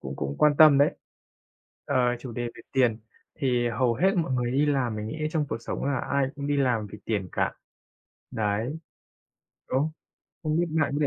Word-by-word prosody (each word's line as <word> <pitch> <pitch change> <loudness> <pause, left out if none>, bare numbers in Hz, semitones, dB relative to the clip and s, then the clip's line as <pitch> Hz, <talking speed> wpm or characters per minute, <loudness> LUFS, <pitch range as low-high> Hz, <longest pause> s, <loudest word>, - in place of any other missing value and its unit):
cũng 65 +1 -6
cũng 70 +1 -3
quan 150 -1 +5
tâm 155 -3 +8
đấy. 145 - +3 0.9
Ờ, - - -1 0.2
chủ 125 -2 -7
đề 120 - -3
về - - -12
tiền, 125 -5 +3 0.4
thì 125 -5 +1
hầu 120 +1 +1
hết 190 +10 +3
mọi 160 -6 0
người 125 -1 0
đi 145 +3 +2
làm 130 -6 0
mình 105 0 -4
nghĩ 155 - -5
trong 155 -3 0
cuộc 110 - -3
sống - - -4
là 140 -1 0
ai 140 -1 +2
cũng 140 -1 -5
đi 145 0 +1
làm 125 -6 +1
vì 105 - -8
tiền 100 -5 -2
cả. - - 0 0.8
Đấy. 110 +7 -1 0.9
Đúng, 135 +4 +1 0.5
không 155 0 0
biết 175 - +2 0.2
bạn - - +1
có 145 - 0
130 Hz, 195 wpm, -27 LUFS, 115-145 Hz, 0.9 s, tâm